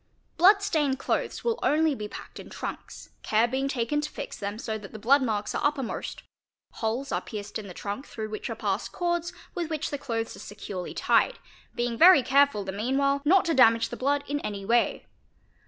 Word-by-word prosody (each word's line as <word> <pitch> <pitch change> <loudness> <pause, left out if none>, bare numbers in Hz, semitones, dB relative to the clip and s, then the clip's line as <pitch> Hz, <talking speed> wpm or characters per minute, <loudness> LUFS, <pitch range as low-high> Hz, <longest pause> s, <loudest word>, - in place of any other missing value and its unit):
Blood 400 +4 +6
stained 295 -9 +1
clothes - - -2
will 465 0 0
only 310 0 +3
be 210 -5 -5
packed - - -10
in - - -10
trunks, - - -7
care 220 +2 +2
being 265 +3 -1
taken 275 +2 0
to 300 - -4
fix - - -7
them 205 +1 -4
so 220 -1 -4
that 205 -2 -9
the - - -6
blood 270 +7 +4
marks 215 -5 -1
are - - -2
uppermost; 285 -5 -2 0.5
holes 235 +5 -3
are - - 0
pierced 205 -1 -6
in 210 - -8
the 180 - -8
trunk 205 +7 -5
through 215 -1 -6
which 215 - -5
are - - -3
passed - - -2
cords 345 -1 -1 0.2
with 345 -4 -3
which 310 -2 -2
the 285 - -3
clothes 230 -4 -3
are - - -12
securely 200 -3 -7
tied, - - +2 0.4
being 240 -1 -2
very 345 -5 +8
careful 280 -6 +3
the 190 - -4
meanwhile 270 +7 +1
not 375 +5 +5
to 335 - +1
damage 230 -4 +5
the - - -5
blood 285 +2 0
in 290 +1 -1
any 200 -6 -5
way. 235 +3 +1
260 Hz, 205 wpm, -27 LUFS, 215-295 Hz, 0.5 s, very